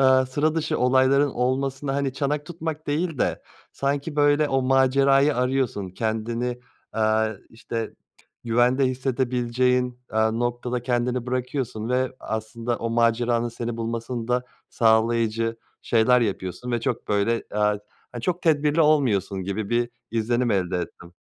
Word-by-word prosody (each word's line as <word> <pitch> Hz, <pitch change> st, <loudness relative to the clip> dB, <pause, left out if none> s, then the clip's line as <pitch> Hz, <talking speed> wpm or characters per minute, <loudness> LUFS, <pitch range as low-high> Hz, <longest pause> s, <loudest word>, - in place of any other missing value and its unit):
aaa, 130 Hz, -1 st, +5 dB
sıra 150 Hz, +4 st, 0 dB
dışı 160 Hz, -1 st, -1 dB
olayların 130 Hz, +3 st, +4 dB
olmasına, 135 Hz, +2 st, -1 dB
hani, 140 Hz, -1 st, 0 dB
çanak 145 Hz, +2 st, -2 dB
tutmak 160 Hz, -2 st, -5 dB
değil 155 Hz, +1 st, -1 dB
de, -, -, 0 dB, 0.3 s
sanki 140 Hz, +2 st, -2 dB
böyle 145 Hz, 0 st, +4 dB
o 135 Hz, -1 st, +1 dB
macerayı 135 Hz, +2 st, +4 dB
arıyorsun 125 Hz, -6 st, 0 dB
kendini, 115 Hz, +4 st, -2 dB, 0.3 s
aaa, 110 Hz, 0 st, +2 dB, 0.2 s
işte, 115 Hz, 0 st, -4 dB
t -, -, -23 dB, 0.5 s
güvende 120 Hz, +3 st, +3 dB
hissedebileceğin, 125 Hz, -1 st, 0 dB
aaa, 110 Hz, 0 st, +2 dB
noktada 120 Hz, +1 st, -2 dB
kendini 125 Hz, 0 st, -1 dB
bırakıyorsun 125 Hz, -3 st, -3 dB
ve 130 Hz, +1 st, 0 dB
aslında 115 Hz, +2 st, -3 dB
o 115 Hz, -, -3 dB
maceranın 115 Hz, 0 st, +2 dB
seni 115 Hz, 0 st, -5 dB
bulmasını 115 Hz, +1 st, -4 dB
da 125 Hz, 0 st, +1 dB, 0.3 s
sağlayıcı 115 Hz, 0 st, +2 dB, 0.3 s
şeyler 120 Hz, +2 st, +4 dB
yapıyorsun 100 Hz, +1 st, -3 dB
ve 120 Hz, -, 0 dB
çok -, -, -3 dB
böyle, 105 Hz, +3 st, +1 dB
aaa, 105 Hz, 0 st, +1 dB, 0.3 s
hani, 120 Hz, -, -6 dB
çok 180 Hz, +4 st, -1 dB
tedbirli 150 Hz, -1 st, +2 dB
olmuyorsun 120 Hz, -, +2 dB
gibi 100 Hz, +2 st, -3 dB
bir 120 Hz, 0 st, +1 dB, 0.2 s
izlenim 120 Hz, +2 st, 0 dB
elde 95 Hz, -3 st, 0 dB
ettim. 85 Hz, 0 st, -8 dB
125 Hz, 135 wpm, -24 LUFS, 115-135 Hz, 0.5 s, aaa